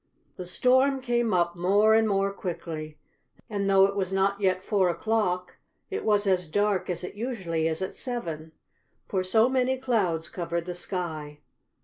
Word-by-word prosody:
The 180 - -7
storm 260 +7 +3
came 240 -3 0
up 175 -2 +1
more 200 +5 +4
and 220 0 +4
more 195 -1 +1
quickly, 160 -5 -6 0.5
and, 200 -2 -2
though 195 0 +6
it 200 0 -1
was 190 -2 -1
not 195 +1 +1
yet 185 -1 +1
four 195 -4 +2
o'clock, 180 -2 -1 0.3
it 400 - -3
was 210 -1 +2
as 185 -3 +1
dark 195 +2 0
as 175 -1 -2
it 180 - -6
usually 190 -9 -2
is 160 +3 -1
at 190 - -5
seven, 165 -11 -5 0.5
for 190 -2 -1
so 220 +5 +4
many 260 0 +1
clouds 195 -11 0
covered 170 -1 -3
the 180 - -4
sky. 160 -5 -5
190 Hz, 165 wpm, -27 LUFS, 175-220 Hz, 0.5 s, though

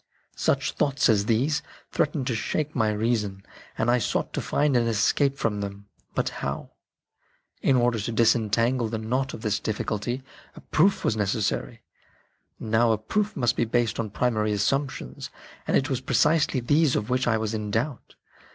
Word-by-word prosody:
Such - - +1
thoughts 140 -1 +1
as 105 -2 +3
these 135 +7 +2 0.3
threatened 150 -3 0
to 125 - 0
shake 150 +7 -2
my 110 -4 +2
reason, 105 -3 -1 0.3
and 115 +2 +2
I 125 - +3
sought 110 - -1
to - - -2
find 145 -2 +1
an 120 -1 +3
escape 135 +6 +2
from 105 -2 -1
them. 100 0 -7 0.3
But - - +1
how? 70 0 -4 0.9
In 135 - +3
order 120 -2 +2
to 105 +3 -3
disentangle 115 +1 +2
the 110 +1 -3
knot 125 +5 -2
of - - -10
this 105 -1 0
difficulty, 110 +4 -3 0.3
a - - -11
proof 190 +6 +2
was - - +2
necessary. 100 - -1 0.8
Now 115 +1 +2
a 110 - +2
proof 205 - -1
must 120 -1 +2
be - - +1
based 115 0 0
on 110 -2 -2
primary 110 -1 0
assumptions, 105 - -2 0.4
and - - +3
it 135 - 0
was 135 -3 -2
precisely 145 +2 +2
these 145 +3 +3
of 105 +4 -2
which 125 0 +1
I 115 -2 +3
was 110 0 -2
in 105 -1 -3
doubt. 120 +6 -3
115 Hz, 170 wpm, -26 LUFS, 110-135 Hz, 0.9 s, as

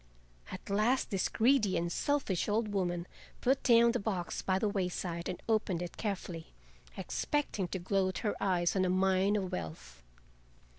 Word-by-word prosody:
At - - -8
last 225 +7 +2
this 195 -2 0
greedy 230 -4 +3
and 170 0 -1
selfish 270 -10 0
old 215 +1 +1
woman 175 -4 -1 0.3
put 265 +2 +2
down 235 -1 +6
the 245 - -1
box 195 -4 -3
by 190 -1 +1
the 215 - +1
wayside 180 -3 -2
and 180 - -4
opened 205 -6 +1
it 175 - -7
carefully, 180 -6 -5 0.4
expecting 285 -10 -1
to 190 - -3
gloat 185 +1 0
her 210 - +1
eyes 175 -2 +1
on 190 - +2
a 185 - +1
mine 190 +2 +2
of 190 -3 -2
wealth. 65 -7 -6
190 Hz, 160 wpm, -32 LUFS, 175-215 Hz, 0.4 s, down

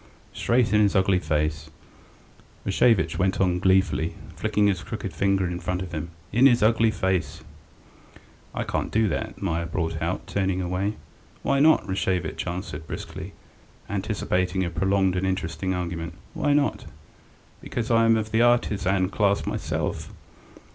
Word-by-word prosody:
straight 120 -3 +1
in 105 - +5
his 100 -1 +3
ugly 95 -1 +3
face," 75 -1 -1 1.0
Rashevitch 115 -6 +2
went 95 0 +1
on 90 -2 +2
gleefully, 95 -3 +2 0.2
flicking 105 - +1
his 95 -4 +1
crooked - - -5
finger 95 -1 +1
in 90 0 -3
front 90 +1 -2
of 90 - -8
him. 80 0 -4 0.2
"In 120 +6 +6
his 120 -4 +3
ugly 115 +1 +4
face!" 95 -4 -1 1.1
"I - - -1
can't - - -2
do 110 0 +2
that," 110 0 -4
Meier 85 -3 -1
brought 80 -2 -2
out, 85 +4 -2
turning 95 -2 -1
away. 95 +3 -1 0.5
"Why 140 - +2
not?" 155 -4 +5
Rashevitch 90 -3 -1
answered 85 -3 -5
briskly, - - -7 0.5
anticipating 95 -2 -1
a 85 - -3
prolonged 95 +1 +1
and 95 +1 0
interesting 95 -1 -2
argument. 85 -2 -4 0.2
"Why 145 - +1
not?" 145 -1 +1 0.8
"Because 120 -1 -3
I 115 0 +5
am 115 0 +5
of 110 0 -3
the 110 - +3
artisan 100 -6 +2
class 100 -1 +1
myself!" - - -3
95 Hz, 145 wpm, -25 LUFS, 90-105 Hz, 1.1 s, In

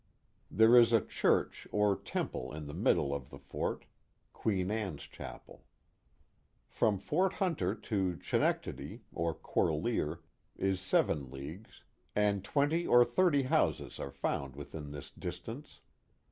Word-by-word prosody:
There 110 +2 +6
is 120 -1 +7
a 115 - +7
church - - +1
or 105 -1 +3
temple 65 - -4
in 75 -1 -6
the 75 - -7
middle 70 -1 +2
of 70 -3 -5
the 70 - -10
fort 70 0 -4 0.5
(Queen 95 -3 0
Anne's 100 -9 -3
Chapel). - - -10 1.0
From 105 -2 +1
Fort 190 - +1
Hunter 150 - 0
to 95 -5 -1
Chenectadi, - - -1
or 85 -1 -1
Corlear, 80 -1 0 0.4
is 95 -1 0
seven 75 -7 +1
leagues, 75 - -9 0.3
and 105 -2 +2
twenty 145 +9 +1
or 120 0 +7
thirty 170 -5 +3
houses 130 - +1
are - - -4
found 70 -1 -3
within 75 +1 -7
this 70 -1 -8
distance. - - -7
95 Hz, 130 wpm, -33 LUFS, 75-115 Hz, 1.0 s, is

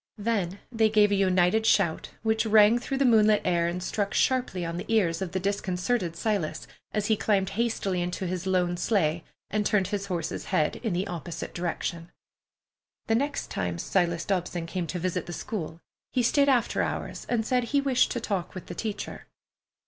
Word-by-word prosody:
Then 205 -4 -1
they 225 -2 +3
gave 210 -1 +4
a - - +3
united 190 +2 +3
shout 195 -7 +2
which 220 0 +1
rang 215 +2 +6
through 270 +2 -3
the 275 - +2
moonlit 215 -3 +5
air 170 -2 +2
and 175 +1 -3
struck 200 +1 -2
sharply 245 -9 +1
on 170 0 -4
the - - -5
ears 185 -6 +2
of 185 -3 -3
the 190 - -1
disconcerted 185 -1 -1
Silas 195 -3 -1 0.3
as 210 -1 -1
he 220 - +3
climbed 195 -3 +1
hastily 200 -5 -1
into 180 +2 -3
his 185 +1 -3
lone 180 -2 +1
sleigh 170 -5 +1 0.3
and 210 0 +1
turned 205 -3 +1
his 200 -1 -3
horse's 170 -4 -3
head 150 - +1
in 225 -6 -2
the 180 +3 0
opposite 170 -3 -6
direction. 170 -1 -3 1.0
The 225 - +1
next 285 +5 -1
time 90 -2 -2
Silas 170 - 0
Dobson 180 -3 -1
came 170 0 -3
to 180 - -3
visit 180 0 -2
the 175 - -5
school 165 -4 -5 0.3
he 250 - +1
stayed 280 +4 +3
after 250 -4 +2
hours - - -4
and 230 -2 +1
said 250 0 +1
he 280 +4 +1
wished 270 -3 +2
to 240 - -2
talk 195 -6 -3
with 185 - -7
the - - -7
teacher. 215 -3 -5
195 Hz, 185 wpm, -27 LUFS, 175-220 Hz, 1.0 s, rang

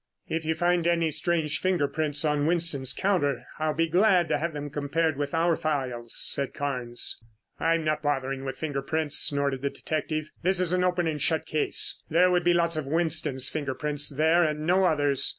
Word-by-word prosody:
"If 165 0 -3
you 160 +1 0
find 175 0 +1
any 170 -2 +2
strange 155 0 0
finger 180 -6 +1
prints 150 0 -1
on 150 -1 +1
Winston's 160 -6 +1
counter, 145 -9 0 0.2
I'll 155 -1 0
be 165 +1 +1
glad 180 0 +3
to 150 -1 +1
have 170 +2 -2
them 145 -1 -6
compared 150 +2 0
with 145 +2 -3
our 165 0 +2
files," 130 -7 -3
said 140 -1 0
Carnes. 125 -4 -2 0.4
"I 165 0 +2
am 165 - -2
not 155 0 0
bothering 135 -2 -1
with 135 -1 -5
finger 145 -2 -3
prints," 155 +1 -1
snorted 140 -2 +1
the 140 - 0
detective. 155 +1 -3
"This 185 +1 +1
is 180 -1 +2
an 180 0 +2
open 180 -1 +1
and 155 -3 -2
shut 160 +2 +1
case. 155 - 0
There 180 +3 +4
would 180 -1 +2
be 175 - +4
lots 170 -1 +1
of 150 -3 -3
Winston's 155 -4 0
finger 140 -4 -3
prints 150 -1 -1
there 160 +4 +3
and 155 -1 -1
no 185 +3 +3
others. 145 -5 +3
155 Hz, 200 wpm, -27 LUFS, 145-170 Hz, 0.4 s, There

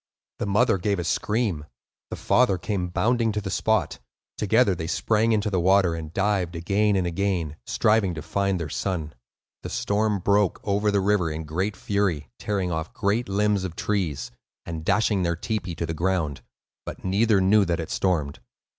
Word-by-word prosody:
The - - -2
mother 100 -1 +3
gave 100 +2 0
a 85 - -2
scream; 100 -2 -1 0.4
the - - -4
father 120 -7 +2
came 90 0 -2
bounding 115 +5 +1
to 105 - -1
the 95 -2 -5
spot; - - 0 0.4
together 110 0 +3
they 80 -2 -4
sprang 110 +5 +1
into 105 -1 +1
the 95 - +1
water, 95 0 +4
and 80 -2 -6
dived 95 -2 0
again 100 +5 +1
and 95 -2 +1
again, 85 -4 -1
striving 105 -5 +2
to 80 - -6
find 100 0 0
their 85 - -3
son. 80 -4 -3 0.5
The - - -6
storm 105 0 0
broke 100 +1 +2
over 105 +1 +1
the 100 -1 +2
river 95 -3 +2
in 80 +1 -4
great 95 +7 -2
fury, 90 -10 -1
tearing 95 -4 -1
off 80 0 -4
great 105 +3 0
limbs 100 0 +1
of 90 -3 -5
trees, 90 -13 -2 0.3
and 80 -2 -5
dashing 100 +2 +2
their 85 -1 0
tepee 95 -1 -3
to 85 - -3
the 80 - -3
ground; 85 -4 -1 0.4
but - - -8
neither 100 +2 +3
knew 100 +3 +4
that 85 -1 -1
it 80 - -5
stormed. 80 -7 0
95 Hz, 180 wpm, -25 LUFS, 85-105 Hz, 0.5 s, water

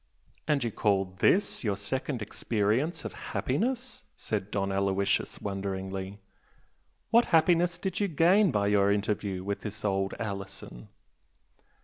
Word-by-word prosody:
"And 145 -4 +2
you 115 - -1
call 95 -3 0
THIS 200 -5 +2
your 100 -4 0
second 130 +3 -3
experience 115 - -1
of - - -5
happiness?" 250 +1 -2
said 105 -2 -3
Don 100 -1 -1
Aloysius, 100 0 0
wonderingly 95 0 -4 0.9
"What 235 +1 +6
happiness 170 +1 +3
did 190 +1 -3
you 205 - +2
gain 180 +5 +4
by 105 -7 +1
your 100 -1 +3
interview 100 -2 -1
with 100 +1 -3
this 105 0 -6
old 95 -1 0
Alison?" 100 - -6
105 Hz, 125 wpm, -29 LUFS, 100-160 Hz, 0.9 s, What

